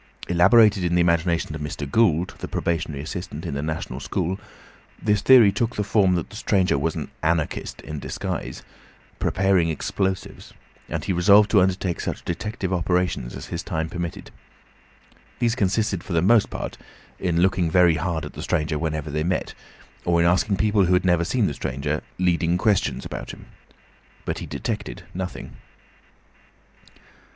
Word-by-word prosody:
Elaborated 100 Hz, +3 st, +5 dB
in 85 Hz, 0 st, +1 dB
the -, -, +3 dB
imagination 85 Hz, -1 st, +1 dB
of 80 Hz, -, -6 dB
Mr. 75 Hz, -1 st, -4 dB
Gould, 90 Hz, -1 st, +2 dB
the -, -, -5 dB
probationary 80 Hz, -4 st, -2 dB
assistant 90 Hz, -1 st, -6 dB
in 85 Hz, -, -3 dB
the 70 Hz, -, -2 dB
National 75 Hz, -4 st, -4 dB
School, 90 Hz, +6 st, -2 dB, 0.6 s
this 105 Hz, -2 st, +1 dB
theory 120 Hz, -6 st, +7 dB
took 115 Hz, +3 st, -1 dB
the 105 Hz, -, 0 dB
form 100 Hz, -2 st, +3 dB
that 85 Hz, -, -3 dB
the -, -, -11 dB
stranger 95 Hz, -5 st, +1 dB
was 75 Hz, +3 st, -1 dB
an -, -, -5 dB
Anarchist 80 Hz, -1 st, -1 dB
in 75 Hz, -1 st, -6 dB
disguise, -, -, -5 dB, 0.6 s
preparing 95 Hz, -3 st, +2 dB
explosives, 95 Hz, +4 st, -3 dB, 0.4 s
and 80 Hz, 0 st, -3 dB
he 95 Hz, -, 0 dB
resolved 100 Hz, +4 st, +5 dB
to 105 Hz, -, +6 dB
undertake 90 Hz, -1 st, 0 dB
such -, -, -4 dB
detective 95 Hz, +2 st, -3 dB
operations 90 Hz, -7 st, 0 dB
as -, -, -7 dB
his 85 Hz, -, -2 dB
time 80 Hz, -5 st, -3 dB
permitted. 85 Hz, -1 st, -5 dB, 1.1 s
These 120 Hz, -2 st, +1 dB
consisted 100 Hz, -4 st, 0 dB
for 95 Hz, -, -6 dB
the 85 Hz, -, +3 dB
most 110 Hz, +2 st, +4 dB
part -, -, -6 dB, 0.4 s
in 85 Hz, -3 st, 0 dB
looking 90 Hz, -2 st, +2 dB
very 90 Hz, 0 st, +5 dB
hard 85 Hz, -1 st, -2 dB
at -, -, -9 dB
the -, -, -7 dB
stranger 75 Hz, 0 st, -1 dB
whenever 80 Hz, -2 st, -3 dB
they 75 Hz, +1 st, -1 dB
met, 90 Hz, +3 st, -1 dB, 0.5 s
or 85 Hz, -1 st, +2 dB
in 85 Hz, -, +3 dB
asking 95 Hz, +3 st, +2 dB
people 105 Hz, -1 st, +3 dB
who 90 Hz, -, +2 dB
had 90 Hz, +1 st, +1 dB
never 90 Hz, -2 st, +3 dB
seen 110 Hz, +5 st, +1 dB
the 75 Hz, -, -1 dB
stranger, 70 Hz, +3 st, -3 dB, 0.2 s
leading 90 Hz, -1 st, +1 dB
questions 105 Hz, 0 st, +1 dB
about -, -, -6 dB
him. -, -, -10 dB, 0.8 s
But -, -, -3 dB
he -, -, -7 dB
detected -, -, -4 dB
nothing. 95 Hz, 0 st, -6 dB
90 Hz, 165 wpm, -23 LUFS, 80-95 Hz, 1.1 s, theory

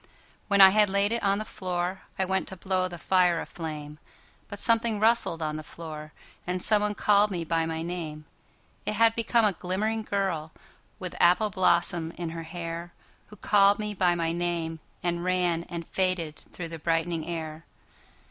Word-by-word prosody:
When 200 Hz, -1 st, +4 dB
I 190 Hz, 0 st, +11 dB
had 210 Hz, 0 st, +4 dB
laid 200 Hz, +2 st, +2 dB
it 235 Hz, -, 0 dB
on 200 Hz, 0 st, +2 dB
the 215 Hz, -, -4 dB
floorI 185 Hz, -1 st, -3 dB
went 190 Hz, 0 st, 0 dB
to 190 Hz, -, -7 dB
blow 185 Hz, 0 st, 0 dB
the 175 Hz, -1 st, -8 dB
fire 180 Hz, -1 st, +3 dB
a -, -, -4 dB
flame, 150 Hz, -2 st, -7 dB, 0.5 s
But 205 Hz, -, -7 dB
something 230 Hz, 0 st, +2 dB
rustled 215 Hz, -7 st, +2 dB
on 155 Hz, 0 st, -2 dB
the -, -, -5 dB
floor, 155 Hz, -1 st, -9 dB, 0.4 s
And 180 Hz, +1 st, -1 dB
someone 210 Hz, +1 st, +2 dB
called 205 Hz, 0 st, +4 dB
me 175 Hz, -4 st, -3 dB
by 165 Hz, 0 st, 0 dB
my 160 Hz, 0 st, -3 dB
name:It 165 Hz, +2 st, -7 dB
had 225 Hz, +1 st, +4 dB
become 230 Hz, 0 st, +2 dB
a 205 Hz, -, +3 dB
glimmering 210 Hz, +6 st, -2 dB
girlWith 185 Hz, -2 st, -5 dB
apple 195 Hz, +5 st, +4 dB
blossom 170 Hz, -3 st, +1 dB
in 170 Hz, -2 st, -4 dB
her 165 Hz, 0 st, -6 dB
hairWho 170 Hz, +4 st, -9 dB
called 200 Hz, -1 st, +5 dB
me 210 Hz, -1 st, -3 dB
by 180 Hz, -2 st, +2 dB
my 165 Hz, -1 st, 0 dB
name 170 Hz, -1 st, -2 dB, 0.2 s
and 175 Hz, -1 st, 0 dB
ranAnd 175 Hz, -2 st, -1 dB
faded 185 Hz, -5 st, -1 dB
through 170 Hz, -2 st, -9 dB
the 165 Hz, 0 st, -7 dB
brightening 165 Hz, 0 st, -1 dB
air. 160 Hz, -2 st, -5 dB
180 Hz, 165 wpm, -27 LUFS, 165-200 Hz, 0.5 s, I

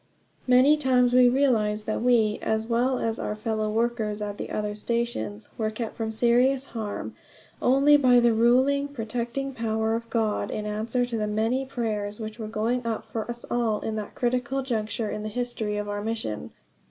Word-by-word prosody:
Many 255 Hz, +4 st, +6 dB
times 250 Hz, -3 st, +3 dB
we 250 Hz, 0 st, +7 dB
realized 220 Hz, -6 st, +2 dB
that 215 Hz, -, -2 dB
we, 230 Hz, -3 st, +3 dB
as 220 Hz, 0 st, 0 dB
well 245 Hz, +3 st, +1 dB
as 225 Hz, -1 st, -2 dB
our 210 Hz, -, -3 dB
fellow 215 Hz, 0 st, -2 dB
workers 220 Hz, -1 st, -1 dB
at 205 Hz, -1 st, -5 dB
the -, -, -5 dB
other 210 Hz, -1 st, -2 dB
stations, 210 Hz, -, -3 dB
were 215 Hz, -1 st, +1 dB
kept 220 Hz, +1 st, -5 dB
from 225 Hz, -1 st, -3 dB
serious 245 Hz, +4 st, +2 dB
harm 215 Hz, -3 st, -4 dB, 0.5 s
only 275 Hz, +3 st, +5 dB
by 250 Hz, -3 st, +5 dB
the 240 Hz, -1 st, +4 dB
over 225 Hz, 0 st, 0 dB
ruling, 265 Hz, +4 st, +4 dB
protecting 245 Hz, +1 st, -4 dB
power 220 Hz, -2 st, -1 dB
of 230 Hz, 0 st, -3 dB
God 220 Hz, -3 st, 0 dB
in 210 Hz, -, -4 dB
answer 220 Hz, +4 st, -1 dB
to 240 Hz, -2 st, -3 dB
the 210 Hz, -, -1 dB
many 225 Hz, +5 st, 0 dB
prayers 210 Hz, -4 st, -3 dB
which 220 Hz, +1 st, -6 dB
were 220 Hz, -, -4 dB
going 230 Hz, +3 st, -1 dB
up 230 Hz, -1 st, -3 dB
for 225 Hz, 0 st, -4 dB
us 240 Hz, 0 st, -6 dB
all 230 Hz, -3 st, 0 dB
at 220 Hz, -, -2 dB
this 210 Hz, -1 st, -4 dB
critical 250 Hz, +2 st, -1 dB
juncture 225 Hz, -3 st, -2 dB
in 210 Hz, -, -4 dB
the 215 Hz, -, -4 dB
history 220 Hz, -2 st, -3 dB
of 210 Hz, 0 st, -3 dB
our 205 Hz, 0 st, -3 dB
mission. 160 Hz, -, -3 dB
230 Hz, 190 wpm, -26 LUFS, 215-245 Hz, 0.5 s, we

